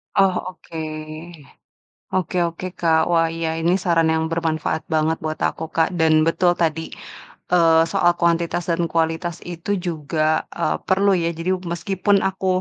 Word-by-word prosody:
Oh, 195 -1 +4 0.2
oke. 165 - -11 1.4
Oke 185 0 -1
oke, 170 +2 -7
Kak, 160 -2 +3
wah 165 -1 +3
iya 165 -1 -2
ini 165 +2 +2
saran 165 -2 +3
yang 160 0 +1
bermanfaat 160 -1 -1
banget 160 +1 +1
buat 155 0 -3
aku - - -6
Kak, 165 -1 +3
dan 160 -1 +4
betul 175 +2 +3
tadi, 160 -1 +1 0.7
eee, 165 -2 +5
soal 175 0 +4
kuantitas 170 0 +1
dan 170 +1 +1
kualitas 165 +1 0
itu 175 +2 -7 0.2
juga, 155 -1 -1
eee, 75 - 0
perlu 195 +1 +3
ya, 165 - +1
jadi 170 +2 -2 0.2
meskipun 190 +4 +1
aku 190 0 -5
165 Hz, 150 wpm, -21 LUFS, 160-175 Hz, 1.4 s, eee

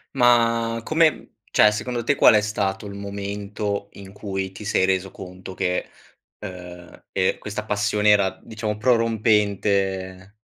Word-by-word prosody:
Ma 115 -2 +3
come 160 +4 +4
mhmm, - - -14 0.2
cioè 105 - +6
secondo 120 +2 -3
te 145 +4 +2
qual - - +6
è 105 - +5
stato 100 -1 -2
il 100 - -8
momento 100 0 -4
in 100 -1 -11
cui 95 -2 -4
ti 105 +2 -10
sei 95 - +2
reso 95 0 0
conto 95 0 -10
che, 90 -1 -1 0.5
uhm, 90 -3 -10
ehm, 95 -1 0
questa 105 +1 -5
passione 105 0 +1
era 95 -2 +3
diciamo 110 -1 -4
prorompente? 100 -4 +1
100 Hz, 145 wpm, -23 LUFS, 95-110 Hz, 0.5 s, cioè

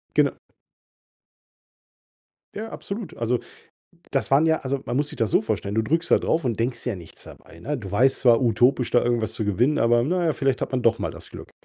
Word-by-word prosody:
Genau. - - +2 2.2
Ja, 220 +2 -5
absolut. 200 -3 -6
Also, 120 +1 0 0.7
das - - -1
waren 145 +4 +5
ja 160 0 +2
also, 135 0 -2
man 120 - -3
muss 145 +1 0
sich - - -9
das 115 -4 0
so - - +4
vorstellen, 100 +2 -3
du 110 - +3
drückst 165 +8 -1
da - - +7
drauf 160 -4 -1
und 115 -3 -1
denkst 120 +2 -1
dir 125 - -1
ja - - -4
nichts 85 -2 -12
dabei, 85 - -14
ne? 145 - -3
Du 100 -5 -8
weißt 130 +6 +3
zwar: 120 -1 +5
Utopisch, 120 +2 +2
da 120 - +4
irgendwas 115 -2 0
zu 110 - -3
gewinnen, 120 +9 +1
aber 120 +1 +3
na 175 +5 0
ja, 160 - +2
vielleicht 135 -2 0
hat - - -3
man 130 -1 0
doch 115 -1 +3
mal 100 - -3
das - - -11
Glück. - - -11
125 Hz, 220 wpm, -24 LUFS, 115-145 Hz, 2.2 s, da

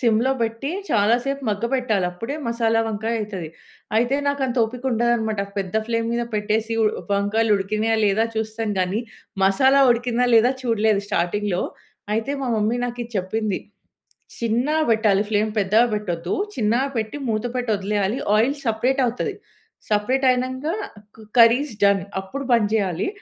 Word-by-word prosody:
సిమ్‌లో 235 +1 +2
పెట్టి 230 +5 -2 0.2
చాలాసేపు 240 +6 +1
మగ్గ 205 +1 -1
పెట్టాలి. 225 -7 +1
అప్పుడే 230 +11 -5
మసాలా 230 -1 +1
వంకాయ 220 +1 -2
అయితది. 195 -6 -5 0.5
అయితే 240 +4 +2
నాకు 285 0 -1
అంత 250 0 -3
ఓపిక 245 +3 -7
ఉండదనమాట. 225 -3 +1 0.2
పెద్ద 190 -1 -4
ఫ్లేమ్ 230 0 -1
మీద 240 - 0
పెట్టేసి 215 +2 0 0.4
వంకాయలు 210 +2 +2
ఉడికినయా 215 +3 0
లేదా 205 +3 +2
చూస్తాం 220 0 -2
గానీ, 185 +4 0 0.4
మసాలా 265 +8 +4
ఉడికిందా 245 +1 +1
లేదా 235 +3 +5
చూడలేదు 220 -3 +1
స్టార్టింగ్‌లో. 185 +1 0 0.5
అయితే 225 +5 -1
మా 260 - -2
మమ్మీ 215 +3 +1
నాకిది 240 -1 -5
చెప్పింది. 205 +2 -2 0.8
చిన్నగా 245 +7 +1
పెట్టాలి 215 -3 +3
ఫ్లేమ్ 215 0 +1
పెద్దగా 210 +4 +4
పెట్టొద్దు 180 -6 -2 0.2
చిన్నగా 235 +5 +1
పెట్టి 220 +4 -2
మూత 215 -1 -1
పెట్టి 250 -2 -2
వదిలేయాలి 200 +2 -1 0.2
ఆయిల్ 240 +6 +2
సెపరేట్ 245 +3 0
అవుతది. 245 0 -1 0.6
సెపరేటైనంక 255 +4 +1 0.5
క 220 - -13 0.2
కర్రీ 230 +2 +7
ఇజ్ 270 - -10
డన్ 200 -1 +4 0.2
అప్పుడు 270 +9 -6
బంద్ 230 -4 +3
చేయాలి. 190 -6 0
225 Hz, 140 wpm, -22 LUFS, 210-240 Hz, 0.8 s, కర్రీ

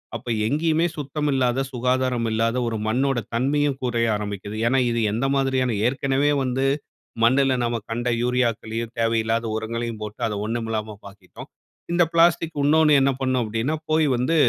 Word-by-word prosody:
அப்ப 115 +2 -8 0.2
எங்கேயுமே 160 +6 +1
சுத்தமில்லாத, 135 -3 0
சுகாதாரமில்லாத 120 -2 0
ஒரு 115 -1 -2
மண்ணோட 130 +3 +1
தன்மையும் 140 +3 +1
குறைய 120 -2 0
ஆரம்பிக்கிது. 105 0 -5
ஏனா 130 +2 +3
இது 115 - 0
எந்த 115 +6 -1
மாதிரியான 130 -3 +1
ஏற்கனவே 135 +2 +1
வந்து 130 +1 -1 0.6
மண்ணுல 130 +2 +4
நாம 120 -1 -1
கண்ட 120 +2 -2
யூரியாக்களையும், 115 -2 -1
தேவையில்லாத 115 0 +1
உரங்களையும் 115 0 -4
போட்டு 105 0 -7
அதை 105 - -3
ஒண்ணுமில்லாம 110 -1 -3
ப - - -19
ஆக்கிட்டோம். 95 -2 -13 0.4
இந்த 175 0 +4
பிளாஸ்டிக். 165 -1 +3
இன்னோண்ணு 155 +1 +4
என்ன 135 +1 +3
பண்ணும் 130 -1 +1
அப்படினா 115 +7 -1 0.2
போய் 155 -1 +3
வந்து 125 +7 0
125 Hz, 140 wpm, -23 LUFS, 115-135 Hz, 0.6 s, மண்ணுல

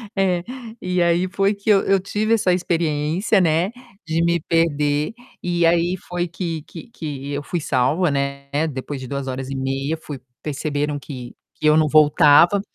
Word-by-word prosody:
É, 185 -3 +1 0.4
e 180 -1 0
aí 170 +1 +2
foi 195 +2 +1
que 200 +1 -5
eu 200 -2 +6
eu 195 0 +3
tive 210 +4 -1
essa 205 -5 +3
experiência, 170 +3 +1
né, 170 +3 +2 0.3
de 165 +1 0
me 170 0 +2
perder, 150 0 +1 0.3
e 175 -1 +1
aí 170 +2 +3
foi 175 0 -1
que 170 -2 -4
que 165 +4 -11
que 145 - -6
eu 145 - -3
fui 175 - -3
salva, 150 +4 +1
né, 140 0 -2 0.2
depois 135 +1 -5
de 130 - -7
2 140 +1 -4
horas 130 0 -4
e 135 - -4
meia 135 +3 -2
fui 145 -4 -8 0.2
perceberam 145 0 -2
que 130 -3 -9 0.2
que - - -4
eu 150 - +6
não 155 -1 +4
voltava, 155 +5 +5
160 Hz, 175 wpm, -21 LUFS, 145-180 Hz, 0.4 s, eu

